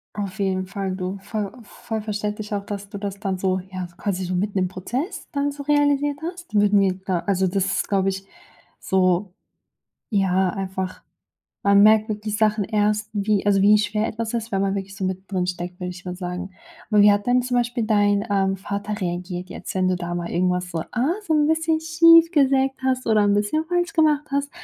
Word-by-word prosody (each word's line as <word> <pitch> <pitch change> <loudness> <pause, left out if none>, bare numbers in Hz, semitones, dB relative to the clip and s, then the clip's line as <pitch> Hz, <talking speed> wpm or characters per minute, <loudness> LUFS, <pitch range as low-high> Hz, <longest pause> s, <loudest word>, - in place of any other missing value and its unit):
Auf 200 -2 -5
jeden 190 -1 0
Fall 190 0 -4
du, 185 +1 -4
voll 205 0 -4
voll 220 +1 -6
verständlich 210 0 -4
auch, 200 -1 -2
dass 200 -1 -6
du 200 - -7
das 200 -1 -5
dann 190 -2 -2
so 185 0 0
ja, 185 -1 -4
quasi 190 -3 -2
so 180 +1 -3
mitten 200 +2 -1
im 185 - +2
Prozess 240 - -5
dann 285 0 -1
so 285 0 -8
realisiert 290 0 +2
hast. 350 +1 -7
Würden 205 -1 +4
wir 190 -2 +2
da 185 -3 0
also 190 -2 +2
das 190 +1 0
ist, - - -1
glaub 195 -1 +1
ich, 195 0 -2 0.5
so 185 0 +1 0.8
ja, 190 -3 +2
einfach 190 0 -4 0.6
man 200 0 +6
merkt 215 +1 +5
wirklich 210 0 -3
Sachen 215 -1 +2
erst, 210 +1 0
wie 205 0 0
also 200 -1 +4
wie 210 +1 +6
schwer 210 +1 0
etwas 225 +1 -4
ist, 230 -1 -3
wenn 195 - +1
man 195 0 0
wirklich 195 0 -5
so 195 - -7
mit 185 +1 -4
drin 180 -2 0
steckt, 180 0 -5
würd 180 0 -3
ich 180 - -12
mal 180 -1 -4
sagen. 180 +1 -5 0.4
Aber 210 -1 +5
wie 205 0 +8
hat 205 0 +1
denn 250 +1 +4
zum 245 0 -1
Beispiel 240 -1 0
dein, 205 -2 +3
ähm, 195 -1 +1
Vater 205 +2 -4
reagiert 180 0 -4
jetzt, - - -7
wenn 185 -1 +1
du 185 - +1
da 175 -1 -4
mal 175 0 -3
irgendwas 180 0 0
so, 165 -2 -2
ah, 250 +5 +1 0.2
so 320 - 0
'n 300 -1 +3
bisschen 320 0 +1
schief 330 +1 +6
gesägt 270 -3 +3
hast 255 -1 0
oder 215 -2 +4
'n 205 0 +3
bisschen 205 +10 +1
falsch 350 +1 -1
gemacht 300 -2 +3
hast? 280 0 -1
205 Hz, 210 wpm, -23 LUFS, 190-235 Hz, 0.8 s, wie